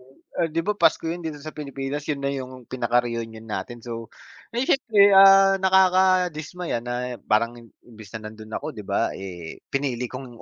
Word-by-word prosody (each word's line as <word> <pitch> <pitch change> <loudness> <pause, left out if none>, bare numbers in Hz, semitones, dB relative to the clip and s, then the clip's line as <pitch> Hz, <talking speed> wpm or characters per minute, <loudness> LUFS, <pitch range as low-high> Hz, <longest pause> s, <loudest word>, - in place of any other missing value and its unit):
eh, 165 -1 -4
'di 165 +1 -2
ba 210 - +1
Pasko 195 - +2
yun 170 +2 -3
dito 160 -2 -5
sa 155 +2 -9
Pilipinas 140 -1 -5
yun 145 - 0
na 140 0 -2
yung 130 -2 -7
pinaka-reunion 115 -2 -2
natin, 120 +2 -6
so 115 -1 -6 0.4
ay 240 +3 -1
siyempre, 215 -8 +4
ah, 195 0 +7
nakadismaya 185 -5 +2
na 125 0 -4
parang 115 +2 +2
i 120 - -13 0.2
imbis 110 -4 -13
na 110 - -12
nandoon 110 0 -7
ako, - - -7
'di 105 - -8
ba, 100 0 -1 0.6
pinili 130 -3 -2
kong 130 -2 -9
135 Hz, 165 wpm, -24 LUFS, 120-180 Hz, 0.6 s, ah